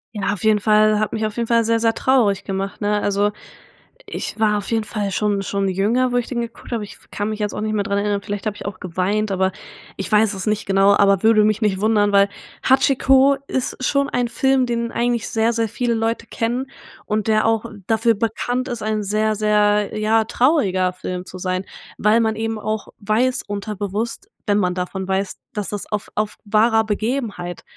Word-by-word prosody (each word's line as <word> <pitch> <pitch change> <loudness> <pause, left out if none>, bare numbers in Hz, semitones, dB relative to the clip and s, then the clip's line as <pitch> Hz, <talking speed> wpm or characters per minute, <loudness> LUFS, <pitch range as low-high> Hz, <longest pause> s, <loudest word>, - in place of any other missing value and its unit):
Ja, 205 - -1
auf 205 - -7
jeden 215 -1 +4
Fall 215 0 +4
hat 215 - -1
mich 220 0 -1
auf 215 +1 -4
jeden 235 -1 -1
Fall 230 0 +3
sehr, 230 +1 +1
sehr 225 0 +2
traurig 230 -8 +2
gemacht, 195 0 -4
ne? 210 0 +1
Also, 205 +1 +1 0.8
ich - - -5
war 210 -1 +3
auf 205 - -5
jeden 225 -1 +1
Fall 210 -1 -3
schon 205 0 0
schon 195 0 -1
jünger, 225 +7 +1
wo 245 - +1
ich 245 - -1
den 240 -2 -2
geguckt 235 0 -8
habe, 240 - -2
aber 215 - -5
ich - - -12
kann 205 +1 -2
mich 215 0 -4
jetzt 210 -1 -2
auch - - -4
nicht 215 0 -1
mehr 210 -1 +1
dran 200 0 0
erinnern. 205 0 -1
Vielleicht 205 -1 -5
habe 210 - -2
ich - - -9
auch 200 -2 -5
geweint, 190 +4 -1
aber 190 0 +1 0.5
ich 195 - -4
weiß 215 0 +4
es 190 +1 -5
nicht 215 0 0
genau, 195 0 +4
aber 200 -1 +3
würde 220 -1 +5
mich 215 +1 +1
nicht 200 -3 +1
wundern, 210 -1 +3
weil 200 0 +5 0.4
Hachiko 270 +1 +4
ist 260 0 -3
schon 280 0 +1
ein 245 -3 0
Film, 265 +2 +2
den 235 -1 -2
eigentlich 235 -1 -1
sehr, 225 +1 +1
sehr 225 -1 0
viele 240 +2 -1
Leute 225 +1 -1
kennen 245 +4 -2 0.4
und 215 0 -1
der 215 -1 +3
auch 225 0 +1 0.2
dafür 225 +1 +3
bekannt 245 +4 -2
ist, 240 -2 -4
ein 215 0 -1
sehr, 215 +2 0
sehr, 210 0 +2
ja, 220 +1 +2
trauriger 205 - +2
Film 180 0 -5
zu 185 - -9
sein, 185 0 -2 0.3
weil 215 +2 +3
man 220 -1 +1
eben 225 0 -3
auch 215 0 -3
weiß, 225 +5 +1
unterbewusst, 210 - -4 0.2
wenn 205 -1 +3
man 180 -2 0
davon 185 +1 -4
weiß, 190 0 -2
dass 210 -2 -3
das 205 -1 -5
auf 210 -1 -3
auf 215 0 -1
wahrer 220 +2 +3
Begebenheit, 215 -5 -3
215 Hz, 210 wpm, -20 LUFS, 200-230 Hz, 0.8 s, würde